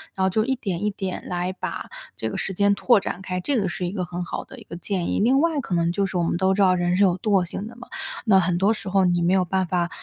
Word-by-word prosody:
然 190 - +1
后 190 - +3
就 215 +3 +2
一 265 0 +1
点 200 -5 -3
一 210 - +2
点 195 -2 -5
来 180 +1 -2
把 185 - -5 0.3
这 110 - -3
个 - - -5
时 195 - -2
间 200 +2 +3
拓 225 +1 +4
展 190 - -5
开， 180 -1 -3
这 250 +6 0
个 195 -3 0
是 180 - -3
一 175 - -2
个 190 -3 -2
很 175 0 -5
好 - - -5
的 - - -13
一 - - -12
个 - - -9
建 180 -1 -2
议。 - - 0
另 255 +6 +4
外 325 -3 +1
可 190 - -5
能 170 0 +2
就 195 +2 0
是 185 - -3
我 170 - +1
们 170 - 0
都 190 0 +2
知 200 - +1
道 185 -1 +5
人 175 0 +1
是 205 - +4
有 185 -2 +3
惰 195 -4 +2
性 195 +4 -5
的 235 - -11
嘛， 240 0 -12 0.4
那 200 -4 +6
很 180 -1 +1
多 200 +4 +3
时 205 - -8
候 195 0 +3
你 175 -1 +2
没 180 +2 +3
有 185 -1 +3
办 190 +1 0
法 175 0 0
190 Hz, 335 characters per minute, -24 LUFS, 175-200 Hz, 0.4 s, 那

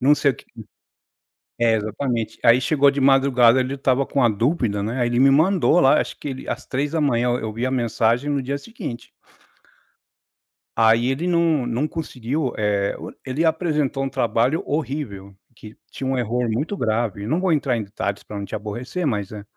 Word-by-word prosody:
não 140 +3 +5
sei 140 -1 +2
o - - -14
que" - - -15 1.2
é, 115 -1 +4
exatamente. 110 +2 -3
Aí 120 +1 +6
chegou 140 0 +3
de 140 0 -3
madrugada, 130 -2 +4
ele 130 +2 -2
estava 135 0 +1
com 140 - -3
uma 120 - +5
dúvida, 115 -2 0
né, 115 +5 -3
aí 120 - +2
ele 120 0 0
me 135 +1 +6
mandou 175 +4 +3
lá, 135 - +5
acho - - -5
que - - -6
ele 130 -1 -7
às - - -4
3h, 140 -3 0
eu 120 - 0
eu 110 -1 -4
vi 115 +3 -3
a - - -1
mensagem 120 +2 0
no 140 -2 0
dia 140 +2 -3
seguinte. 140 - -8 1.7
Aí 115 +2 +4
ele 150 +6 -2
não 170 -7 +2
não 120 +6 -1
conseguiu, 140 -3 -3
eh, 100 -2 0
o - - -8
ele 140 +5 -1
apresentou 150 -4 0
um 135 - -3
trabalho 130 - +1
horrível, 130 -10 -4 0.2
que 110 0 -13 0.2
tinha 135 - -6
um 130 -1 0
erro 120 0 -1
muito 145 - -2
grave. 110 - -1
Não 155 +10 0
vou 190 -1 +1
entrar 135 -6 +1
em - - -2
detalhes 100 0 -4
para 105 - -9
não 100 - -4
te 100 - -8
aborrecer, 120 - -4
mas 105 -6 -2
é. 105 -1 -7
130 Hz, 195 wpm, -22 LUFS, 115-145 Hz, 1.7 s, Aí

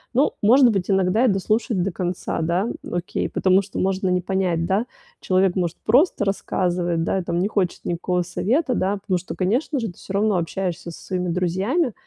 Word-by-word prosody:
Ну, 275 +4 +3
может 245 +3 +6
быть, 195 -3 -2
иногда 195 +4 +3
и - - +4
дослушать 210 -1 +1
до 195 - -1
конца. 175 -1 -3
Да, 170 +6 0 0.2
окей, 175 0 -2
потому 190 +1 +3
что 200 0 -9
можно 190 0 0
не 180 0 +2
понять, 180 -3 0
да. 205 +7 0 0.3
Человек 185 -1 +2
может 175 -3 -1
просто 250 - +3
рассказывать, 175 -3 -1
да, 190 - 0
и - - -4
там 170 0 -2
не 190 - +1
хочет 195 -4 -1
никакого 180 +1 -1
совета, 250 - 0
да, 200 -2 0
потому 190 -2 -1
что, 185 - -7
конечно 240 - 0
же, 230 - -2
ты 175 - -10
всё 190 - -8
равно 205 -1 +2
общаешься 175 0 -3
со 165 - -9
своими 180 -1 -2
друзьями, 190 - 0
190 Hz, 195 wpm, -22 LUFS, 180-210 Hz, 0.3 s, может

